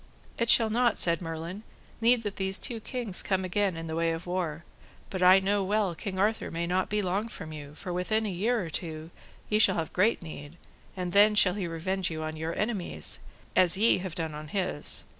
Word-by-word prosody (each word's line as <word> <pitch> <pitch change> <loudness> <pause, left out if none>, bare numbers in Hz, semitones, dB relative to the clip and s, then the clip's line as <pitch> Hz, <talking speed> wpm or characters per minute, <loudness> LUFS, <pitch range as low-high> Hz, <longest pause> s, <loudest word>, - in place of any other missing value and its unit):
It 235 0 +1
shall 225 -2 +6
not, 240 +2 +2
said 170 0 +1
Merlin, 165 +4 -5 0.4
need 235 +1 +4
that 205 -2 -4
these 190 0 0
two 235 -2 -4
kings 225 -4 -2
come 190 -1 0
again 190 -1 0
in 165 - -5
the 160 0 -4
way 165 0 +1
of 165 +2 -6
war, 175 -3 -3 0.5
but 185 - -3
I 185 +1 +8
know 200 +1 +1
well 200 -1 +1
King 190 +2 -5
Arthur 210 +3 +1
may 170 +1 -2
not 180 +2 0
be 210 0 0
long 195 +4 -1
from 160 -8 -8
you, 145 -1 -9
for 180 +1 -6
within 215 +5 0
a - - -1
year 215 +3 0
or 165 - -7
two 160 +1 -5 0.4
ye 210 - +2
shall 200 -3 +5
have 160 -2 -3
great 195 +1 +2
need, 155 0 -9 0.4
and 180 -1 -3
then 210 +1 +6
shall 190 -3 +5
he 195 -3 -3
revenge 180 +3 -2
you 155 -1 -4
on 155 0 -4
your 160 +1 -4
enemies, 210 -5 -1 0.4
as 180 0 +6
ye 220 0 +4
have 180 -3 -5
done 160 -2 -3
on 150 +1 -7
his. 180 -4 0
185 Hz, 215 wpm, -28 LUFS, 165-205 Hz, 0.5 s, I